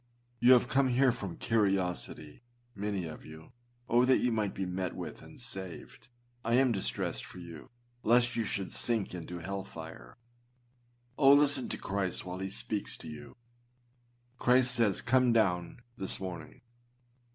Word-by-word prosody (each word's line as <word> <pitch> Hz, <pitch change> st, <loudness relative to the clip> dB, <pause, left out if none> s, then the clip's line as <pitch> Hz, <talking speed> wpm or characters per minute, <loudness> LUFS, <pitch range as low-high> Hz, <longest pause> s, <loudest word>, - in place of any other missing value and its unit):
You 125 Hz, +2 st, +7 dB
have 125 Hz, -1 st, +4 dB
come 135 Hz, +1 st, +3 dB
here 130 Hz, +1 st, +4 dB
from 100 Hz, -7 st, -6 dB
curiosity, 95 Hz, -7 st, -1 dB, 0.3 s
many 100 Hz, -2 st, -3 dB
of 80 Hz, -1 st, -8 dB
you. 80 Hz, +4 st, -12 dB, 0.4 s
Oh! 120 Hz, +1 st, +4 dB
that 130 Hz, 0 st, +5 dB
you 125 Hz, -, +1 dB
might 105 Hz, -3 st, -1 dB
be 95 Hz, -, -2 dB
met 90 Hz, 0 st, -3 dB
with -, -, -7 dB
and 150 Hz, -, -14 dB
saved. 95 Hz, -8 st, -7 dB, 0.4 s
I 115 Hz, -, +2 dB
am 130 Hz, 0 st, +4 dB
distressed 65 Hz, -, -2 dB
for -, -, -11 dB
you 85 Hz, -3 st, -10 dB, 0.3 s
lest 120 Hz, +1 st, +3 dB
you 115 Hz, -, 0 dB
should 95 Hz, -2 st, -3 dB
sink 115 Hz, -6 st, -1 dB
into 90 Hz, 0 st, -6 dB
hell 95 Hz, +3 st, -4 dB
fire. 80 Hz, -9 st, -10 dB, 1.0 s
Oh! 140 Hz, -1 st, +8 dB
listen 145 Hz, -2 st, +3 dB
to -, -, -3 dB
Christ 95 Hz, -2 st, -2 dB
while 90 Hz, 0 st, -5 dB
he 95 Hz, 0 st, -3 dB
speaks 105 Hz, +1 st, -2 dB
to -, -, -11 dB
you. 75 Hz, -1 st, -9 dB, 1.0 s
Christ 125 Hz, 0 st, +5 dB
says, 115 Hz, -5 st, +2 dB
â -, -, -22 dB
Come 125 Hz, -1 st, +4 dB
downâ 90 Hz, -6 st, +1 dB, 0.2 s
this 95 Hz, -4 st, 0 dB
morning. 90 Hz, -4 st, -7 dB
100 Hz, 160 wpm, -31 LUFS, 90-120 Hz, 1.0 s, Oh